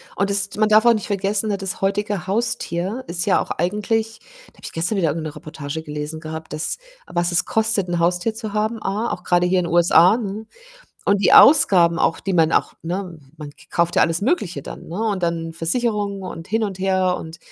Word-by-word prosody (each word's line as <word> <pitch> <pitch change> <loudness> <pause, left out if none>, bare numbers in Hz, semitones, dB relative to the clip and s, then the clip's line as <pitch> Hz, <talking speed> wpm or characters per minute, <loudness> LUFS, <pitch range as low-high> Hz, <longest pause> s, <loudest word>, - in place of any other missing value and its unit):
Und 200 +1 0
das 200 0 +2
man 215 0 +2
darf 215 +2 +5
auch 235 - +7
nicht 215 - -3
vergessen, 200 +1 -1
ne, 200 - -1
das 195 -1 -5
heutige 200 -1 -1
Haustier 210 0 -2
ist 175 +1 -2
ja 195 - +3
auch - - -6
eigentlich 215 +5 -1 0.3
habe - - -26
ich - - -6
gestern 175 +6 -1
wieder 165 -5 +1
irgendwo 155 +1 -3
'ne - - -13
Reportage 155 0 -7
gelesen 150 +1 -6
gehabt, 160 0 -8
dass 155 - -2 0.3
was 175 0 -1
es 175 - +2
kostet, 220 -4 +1
'n 175 -1 -1
Haustier 180 +6 +1
zu 220 -2 -6
haben, 215 +1 -1
A, 210 +5 -2
auch 180 - -5
grade 175 0 +2
hier 185 0 +2
in 175 - -1
den 170 - -4
USA, 175 +3 +5
ne? 215 -1 -5 0.6
Und 200 0 +3
die - - +3
Ausgaben 180 - +6
auch, 165 - +1
die 195 - -3
man 160 -1 +3
auch, - - +1
ne 175 0 -5 0.2
man 150 -1 -8
k - - -25
kauft 170 0 0
ja - - +5
alles 165 +1 +1
Mögliche 210 - -1
dann, - - -10
ne? 170 - -6
Und 205 -5 -1
dann 165 -1 -2
Versicherungen 200 +2 -1
und 165 -2 -8
hin 225 +2 0
und 195 -2 -5
her 185 -1 +1
und, 160 +1 -9
185 Hz, 220 wpm, -21 LUFS, 170-210 Hz, 0.6 s, auch